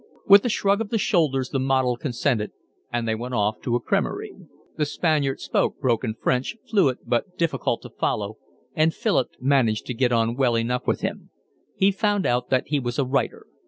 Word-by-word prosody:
With 200 0 +8
a - - +2
shrug 200 -1 +1
of 215 - -4
the 225 - 0
shoulders 150 - +1
the 135 - -1
model 130 -2 +1
consented, 120 -3 -1 0.4
and 120 -1 -1
they 110 - +1
went 120 +3 -4
off 105 0 0
to 120 - -1
a - - +2
cremerie. - - -2 0.4
The 150 - 0
Spaniard 145 -3 0
spoke - - -1
broken 120 -4 0
French, 125 - 0
fluent 175 - +2
but 180 +10 -1
difficult 165 -1 -1
to - - -10
follow, 105 +1 -2 0.4
and 160 +1 +2
Philip 130 - +1
managed 125 -5 +2
to 125 - -4
get 125 +1 +1
on 115 0 +1
well 125 -3 +2
enough 125 +2 -1
with - - 0
him. - - -4 0.5
He 195 +1 +3
found 205 0 0
out 125 0 0
that 130 0 +1
he 145 -1 +1
was 120 -2 -3
a 140 - +1
writer. 135 +2 -1
130 Hz, 195 wpm, -24 LUFS, 120-155 Hz, 0.5 s, With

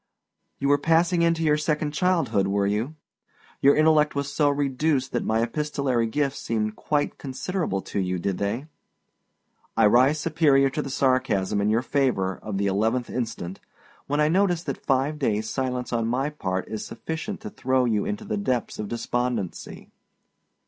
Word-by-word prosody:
You 140 - -1
were 145 0 +4
passing 170 +3 +3
into 165 -1 +2
your 150 -1 +3
second 150 -1 -1
childhood, 150 - +1
were 100 0 +1
you? 110 +9 -1 0.7
Your 140 +1 +6
intellect 155 -1 +4
was 140 0 -2
so 145 -2 +3
reduced 140 -1 0
that - - -1
my 110 +1 +1
epistolary 135 -2 -1
gifts 140 +3 -1
seemed 110 -1 -2
quite 145 -1 -1
considerable 140 - -3
to - - -3
you, 90 -1 -1
did 95 +1 -2
they? 105 +7 -2 1.1
I 115 - +5
rise 130 +8 +4
superior 145 -4 +3
to 150 - -2
the 140 - -6
sarcasm 130 -8 +1
in 105 - +1
your 115 +3 +2
favor 120 -11 0
of 105 -2 -4
the 100 - 0
11th 110 +5 0
instant, 110 -7 -4 0.5
when 145 +1 0
I 150 - +4
notice 175 0 +2
that - - -5
five 140 +3 +1
daysâ 110 -6 0
silence 125 +2 -3
on 115 -1 0
my 135 +5 0
part 95 -10 -3
is 110 - -5
sufficient 165 +6 -5
to 215 -1 -7
throw 130 -6 +1
you 110 -4 +1
into 105 0 -4
the 105 - -2
depths 120 +3 -2
of 105 - -3
despondency. 120 -3 -3
130 Hz, 170 wpm, -25 LUFS, 110-150 Hz, 1.1 s, Your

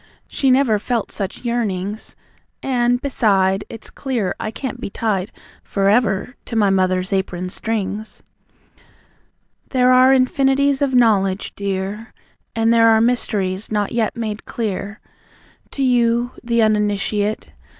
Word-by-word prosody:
She 270 - 0
never 255 -5 +3
felt 235 0 -2
such 200 +4 -5
yearnings? 210 -3 -3 0.5
And, 245 -2 +1
beside, 200 -7 +1
It's 225 - -10
clear 240 -9 -2
I 215 - -3
can't 255 +3 -6
be - - -4
tied 200 -2 -2 0.3
For 195 -1 0
ever 210 0 +1
to 230 - -6
my 205 -3 +3
mother's 185 0 +1
apron 185 -1 -2
strings." 215 0 -4 1.5
There 255 -1 +3
are 255 +1 +6
Infinities 270 +1 +2
of 270 -2 +1
Knowledge, 200 -5 +2
dear. 200 +2 -4 0.4
And 225 0 +3
there 230 0 +5
are 220 -1 +5
mysteries, 215 -5 -1
not 210 -1 0
yet 230 -2 -1
made 215 -2 -4
clear 205 -2 -4 0.7
To 275 - -3
you, 240 -1 +2
the 235 -1 +2
Uninitiate.. 210 0 0
220 Hz, 130 wpm, -20 LUFS, 200-245 Hz, 1.5 s, are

